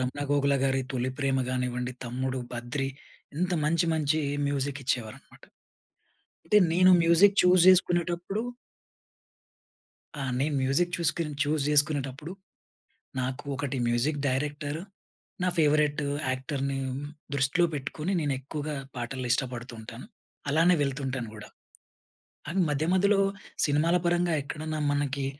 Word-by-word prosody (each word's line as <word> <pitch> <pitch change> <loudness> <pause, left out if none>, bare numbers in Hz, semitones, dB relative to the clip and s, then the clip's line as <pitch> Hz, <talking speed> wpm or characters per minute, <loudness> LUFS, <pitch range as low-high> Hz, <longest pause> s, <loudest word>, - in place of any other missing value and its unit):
రమణ 130 +3 -3
గోగుల‌ 140 -1 +2
గారి 135 0 +1
'తొలి 130 0 -1
ప్రేమ' 135 -1 +1
గానివ్వండి, 125 -1 -2
తమ్ముడు, 130 +2 -3
బద్రి 120 +3 -3 0.5
ఇంత 180 +1 0
మంచి 165 +2 +2
మంచి 155 0 +1 0.3
మ్యూజిక్ 140 0 -2
ఇచ్చేవారన్నమాట. 120 -4 -4 1.0
అంటే 210 - +4 0.2
నేను 185 +2 +6
మ్యూజిక్ 175 +4 +5
చూజ్ 180 -1 +5
చేసుకునేటప్పుడు 175 +2 +2 1.8
ఆ! - - -3 0.2
నేను 145 +2 0
మ్యూజిక్ 170 +7 +1
చూసుకొని 160 -2 +3
చూజ్ 150 0 0
చేసుకునేటప్పుడు, 145 +1 +1 0.9
నాకు 130 +1 -3
ఒకటి 140 0 -3
మ్యూజిక్ 120 +6 +1
డైరెక్టర్, 145 +2 -2 0.6
నా 180 - +2
ఫేవరట్ 150 -1 +3 0.3
యాక్టర్‌ని 135 +1 -2 0.6
దృష్టిలో 140 +6 +2
పెట్టుకొని, 150 +5 -3
నేనెక్కువగా 145 +2 -3 0.2
పాటలు 125 +1 -4
ఇష్టపడుతూ 125 -2 -3
ఉంటాను. 115 - -10 0.4
అలానే 165 +5 +4
వెళ్తుంటాను 135 -3 -3
గూడా. 105 - -10 1.0
కానీ, 175 +5 -1
మధ్య 145 +2 0
మధ్యలో 195 +1 +3 0.5
సినిమాల 155 +4 +2
పరంగా 175 0 +2
ఎక్కడన్నా 155 +2 -4
మనకి 140 -1 -1
145 Hz, 110 wpm, -27 LUFS, 130-165 Hz, 1.8 s, నేను